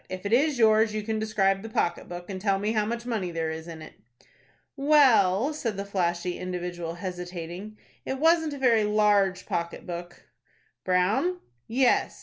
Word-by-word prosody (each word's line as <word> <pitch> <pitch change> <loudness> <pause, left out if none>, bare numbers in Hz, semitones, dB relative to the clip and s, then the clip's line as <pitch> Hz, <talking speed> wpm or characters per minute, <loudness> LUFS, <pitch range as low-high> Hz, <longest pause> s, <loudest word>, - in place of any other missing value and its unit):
If 185 +1 -7
it 200 - -1
is 285 +3 +3
yours 220 -1 +4
you 215 - -2
can 220 0 -2
describe 195 -3 +1
the 225 - -8
pocket 175 -5 -1
book, 175 0 -7
and 190 -2 -6
tell 195 -1 +2
me 205 +2 -1
how 215 -2 0
much 235 +1 -4
money 220 -7 -2
there 165 -1 -2
is 160 +1 -7
in 160 -2 -8
it." - - -12 0.8
"Well," 275 -5 +4
said 230 -9 -3
the 200 - -4
flashy 175 -2 -2
individual, 175 -2 -5
hesitating, 180 +2 -7 0.3
"it 265 - -3
wasn't 320 +1 +3
a - - -6
very 235 -5 +3
large 210 -2 +2
pocket 170 0 -4
book." 175 0 -8 0.6
"Brown?" 190 - +1 0.3
"Yes." 250 +2 +1
200 Hz, 170 wpm, -26 LUFS, 180-230 Hz, 0.8 s, yours